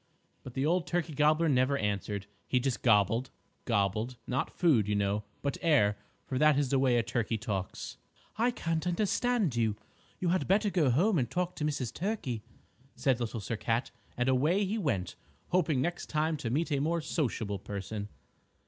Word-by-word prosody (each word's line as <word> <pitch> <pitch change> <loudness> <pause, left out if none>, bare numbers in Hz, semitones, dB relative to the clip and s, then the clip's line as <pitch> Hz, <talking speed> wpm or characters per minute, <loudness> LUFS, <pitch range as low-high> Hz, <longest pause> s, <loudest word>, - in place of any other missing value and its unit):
But 125 - -10
the 135 +1 +1
old 170 +2 +1
Turkey 175 -2 -1
Gobbler 155 +3 +3
never 135 0 +3
answered. 100 -2 -2 0.2
He 125 - +2
just 125 -2 -1
gobbled, 115 +2 +3 0.4
gobbled, 110 +3 0
not 130 +2 -1
food, 135 - +3
you 105 - +1
know, 100 +1 0 0.2
but 140 - -1
air, 135 -11 +4 0.3
for 130 - -2
that 150 -1 +5
is 140 -3 +1
the 135 - +2
way 130 -2 +3
a 115 - +2
turkey 115 0 -1
talks. 100 -4 -4 0.4
"I 230 +3 +2
can't 165 -7 -2
understand 210 - +1
you. 110 -3 +1 0.4
You 180 - 0
had 185 +1 +1
better 205 +2 +3
go 160 -8 +3
home 175 - +3
and 120 -3 -1
talk 180 +4 -2
to - - -3
Mrs. 130 -6 -2
Turkey," 170 - -2 0.5
said 130 -3 +1
Little 115 -1 -3
Sir 110 +2 -3
Cat, 115 +3 -1 0.3
and 125 +1 +1
away 150 +10 +3
he 215 +4 -1
went, 100 - -1 0.3
hoping 160 -7 +2
next 175 +1 -3
time 155 +1 +1
to 130 -5 -3
meet 155 +7 0
a 140 - +2
more 165 +3 0
sociable 115 - -2
person. 100 +1 -5
135 Hz, 180 wpm, -31 LUFS, 115-165 Hz, 0.5 s, that